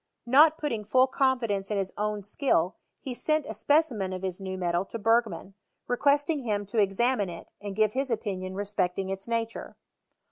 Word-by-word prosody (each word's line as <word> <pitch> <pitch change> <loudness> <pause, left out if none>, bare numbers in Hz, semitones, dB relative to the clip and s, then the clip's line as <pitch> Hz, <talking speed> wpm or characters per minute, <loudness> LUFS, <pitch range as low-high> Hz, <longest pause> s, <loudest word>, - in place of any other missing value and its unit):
Not 300 +6 +6
putting 240 -10 -2
full 255 +5 +4
confi 260 -3 +1
dence 195 -1 -2
in 210 - -1
his 195 -1 -2
own 210 -1 -2
skill, 200 - +1 0.3
he 260 - -5
sent 305 +4 0
a - - -5
specimen 255 -11 +1
of 185 0 -6
his 185 0 -4
new 190 -1 -4
metal 175 -1 0
to 230 - -6
Bergman, 225 -2 +1 0.3
requesting 285 +4 +2
him 210 -5 -2
to 225 - +2
examine 205 +1 +2
it 170 - -9
and 205 -1 -6
give 215 0 +2
his 270 +1 -1
opinion 190 -5 -3
respecting 195 -2 -1
its 195 +2 -4
nature. 230 -1 -3
210 Hz, 180 wpm, -28 LUFS, 195-260 Hz, 0.3 s, Not